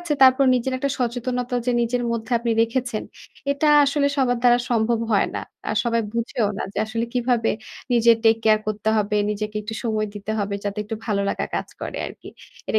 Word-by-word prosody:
আছে। 345 -4 -2
তারপর 260 +1 +7
নিজের 255 +2 -1
একটা 280 +1 -1
সচেতনতা 245 +1 -2
যে 250 - +2
নিজের 245 +1 0
মধ্যে 230 +2 -4
আপনি 235 0 -2
রেখেছেন। 235 -1 -2 0.5
এটা 300 +2 +1 0.2
আসলে 280 0 +1
সবার 250 -3 +2
দ্বারা 245 0 +5
সম্ভব 230 0 +2
হয় 200 - +3
না। - - -2 0.3
আর 215 - -1
সবাই 230 -1 +1
বুঝেও 235 -2 -1
না - - -2
যে - - -4
আসলে 230 +1 -2
কীভাবে 240 -2 +1 0.4
নিজের 235 -1 +5
টেককেয়ার 220 -1 +4
করতে 215 0 -2
হবে। 210 0 +1
নিজেকে 210 0 -4
একটু 220 +1 -6
সময় 215 -1 0
দিতে 205 +1 -4
হবে 200 -1 -1
যাতে 205 +1 -3
একটু 220 +1 -5
ভালো 200 -2 0
লাগা - - -2
কাজ - - -2
করে - - -5
আরকি। - - -11 0.4
এটা 220 - +2
230 Hz, 190 wpm, -23 LUFS, 215-245 Hz, 0.5 s, তারপর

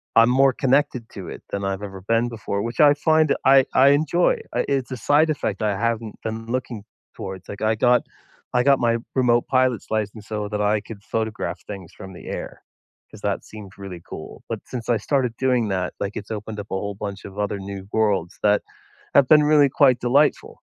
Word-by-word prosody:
I'm 115 +2 +6
more 135 +1 +5
connected 135 -1 +1
to 95 -4 -8
it - - -9
than 100 0 -3
I've 95 +1 -2
ever 95 -2 -7
been 115 +4 +1
before, 110 -3 -3
which 115 0 -5
I 145 -1 +7
find 155 0 +3
I 135 0 +7
I 135 +2 +7
enjoy. 155 +5 +2
I - - +1
it's 135 -2 -1
a 130 - -4
side 150 +7 +3
effect 110 -9 -2
I 105 -2 0
haven't 115 -1 -2
been 115 0 -5
looking 120 -3 -3 0.3
towards. 95 -1 -7
Like, 100 - -8
I 110 +1 +2
got 125 +2 +4 0.5
I 125 - +4
got 140 0 +4
my 115 -1 +2 0.2
remote 120 -2 +3
pilot's 130 -3 +1
license 110 0 -3
so 105 -1 -3
that 105 -1 -3
I 105 0 +2
could 105 -2 -11
photograph 110 -1 -3
things 95 -4 -8
from 95 -2 -10
the - - -12
air - - -6 0.5
'cause - - -13
that - - -2
seems 105 -3 -11
really 95 -3 -8
cool, - - -9
but - - -3
since 120 -3 -6
I 120 - +3
started 125 +1 0
doing 125 -4 +1
that, 90 -1 -2
like, 100 0 -3
it's 105 +1 -7
opened 105 0 -5
up 105 - -8
a - - -1
whole 100 +1 -3
bunch 100 -1 -6
of 100 0 -10
other 105 -1 -2
new 95 0 -7
worlds 100 -5 0
that 105 0 +3 0.5
have 140 -2 +6
been 150 0 +6
really 150 -2 +5
quite 130 -3 +4
delightful. 140 +5 +2
115 Hz, 210 wpm, -23 LUFS, 100-130 Hz, 0.5 s, I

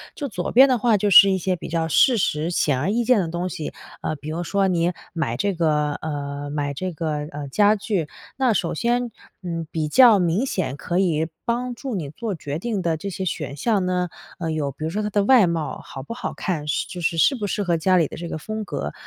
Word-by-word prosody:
就 285 - -4
左 180 -5 -3
边 265 +3 +7
的 255 - +3
话 230 0 +3
就 205 +1 +1
是 195 +1 +9
一 190 - +2
些 185 +1 -1
比 - - -8
较 165 0 0
事 235 - +4
实、 160 -4 0
显 145 -6 +1
而 150 - -1
易 235 +2 +1
见 250 -2 +4
的 175 - 0
东 175 +2 -2
西， 155 - -5 0.3
呃， 155 - -2
比 150 +1 -8
如 165 +3 -3
说 195 +2 +1
你 175 -1 +1 0.2
买 155 -9 -1
这 200 +7 0
个 150 -3 +1
呃， 145 -2 -5
买 145 -1 -2
这 185 +6 -4
个， 155 0 -3 0.2
呃， 145 0 -6
家 205 +6 +4
具， 200 -6 -2 0.3
那 255 -4 +3
首 175 -4 -1
先， 240 +6 0 0.3
嗯， 165 -2 -4
比 155 -2 -1
较 235 - +7
明 180 +7 +1
显 185 - -2
可 175 - -2
以 160 -4 +1 0.2
帮 245 +1 -2
助 260 -1 -5
你 155 -7 -4
做 220 +7 -4
决 145 -4 -5
定 215 -2 -2
的 165 -2 0
这 200 +5 -5
些 190 0 -4
选 145 -4 -3
项 205 - +1
呢， 180 0 0 0.3
呃， 165 -2 -2
有 150 -3 -1
比 145 - -9
如 - - -1
说 210 +5 -2
它 210 - -1
的 205 0 +1
外 240 -5 +6
貌 165 -2 -2
好 135 - -8
不 145 - -7
好 235 - -5
看， 160 -6 -3
适 150 - -1
就 180 - -7
是 165 0 0
适 270 - +4
不 220 -5 -3
适 205 +1 -2
合 175 -3 +1
家 185 +3 +3
里 165 -4 +3
的 - - -9
这 170 0 -6
个 - - -4
风 215 +7 -5
格。 75 - -4
175 Hz, 265 characters per minute, -23 LUFS, 155-210 Hz, 0.3 s, 是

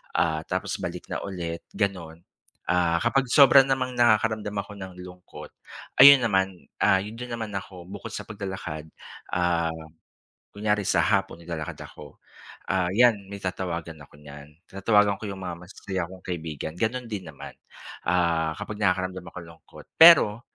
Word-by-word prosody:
ah, 80 -1 +1
tapos - - -3
balik - - -6
na - - -2
ulit 85 -3 -5
ganon. 90 -5 -3 0.5
Ah, 85 -1 +2
kapag 135 -1 +2
sobra 140 -1 +8
namang 130 -1 -1
nakakaramdam 110 -3 +2
ako 105 - -13
ng 95 -1 -8
lungkot, 90 0 -12 0.5
ayun 140 -1 +10
naman, 95 -4 -1
ah, - - +5
yun 105 +3 -8
din 125 0 -7
naman 110 -2 -4
naman 100 - -3
ako, 90 -3 -13
bukod 100 +3 -8
sa - - -5
paglalakad, 95 -7 -6 0.5
ah, 85 -2 +1 0.8
kunyari 105 0 0
sa - - +2
hapon 95 -4 0
naglalakad 80 -3 -5
ako, 75 -2 -14 0.6
ah, 90 -2 +1
yan 120 -1 +5
may 100 - -7
tatawagan 85 -3 -4
ako - - -19
niyan. 75 0 -12 0.2
Tatawagan 100 +1 +2
ko 110 - -6
yung 95 -1 -7
mga 90 -2 -5
masasaya 90 -1 -5
kong 95 -1 -13
kaibigan 80 -4 -5
ganun 120 +4 -1
din 95 -5 -5
naman, 75 -3 -10 0.5
ah, 85 -2 +1
kapag 105 0 -6
nakakaramdam 95 -1 -1
akong 90 - -9
lungkot 85 0 -15 0.2
pero 160 -10 +8
95 Hz, 155 wpm, -25 LUFS, 85-105 Hz, 0.8 s, ayun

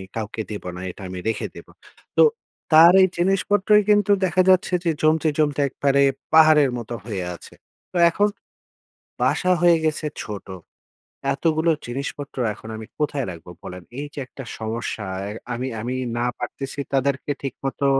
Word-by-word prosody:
কাউকে 110 0 -4
দিব 105 - -6
না, 90 - -7
এটা 95 - -14
আমি 90 0 -6
রেখে 110 - -1
দিবো। - - -12 0.5
তো - - +8 0.5
তার 165 +3 +9
এই - - +5
জিনিসপত্রই 195 +3 +3
কিন্তু 205 -1 +4
দেখা 185 +1 +2
যাচ্ছে 185 0 +3
যে, 170 - +2
জমতে, 155 +1 +3
জমতে, 150 -2 +1
একবারে 140 +1 +1 0.3
পাহাড়ের 155 -4 +6
মতো 120 0 -6
হয়ে 100 -6 -3
আছে। - - -14 0.4
তো 185 - -3
এখন 205 +5 +2 0.9
বাসা 185 -1 +2
হয়ে 175 -1 +6
গেছে 155 0 0 0.2
ছোট, 105 -3 -7 0.9
এতগুলো 160 +3 +1 0.2
জিনিসপত্র 140 +3 -5 0.2
এখন 110 - -12
আমি 110 0 -8
কোথায় 145 -3 -1
রাখবো 85 0 -10
বলেন? 90 0 -8 0.2
এই 145 - -3
যে - - -8
একটা 135 +1 -10
সমস্যা 110 -2 -4 0.2
এ - - -5 0.2
আমি, 125 +2 -3
আমি, 125 +3 -3 0.2
না 120 - 0
পারতেছি 135 +1 -6
তাদেরকে 140 +1 0
ঠিকমতো 135 +1 -3
140 Hz, 155 wpm, -22 LUFS, 115-165 Hz, 0.9 s, তার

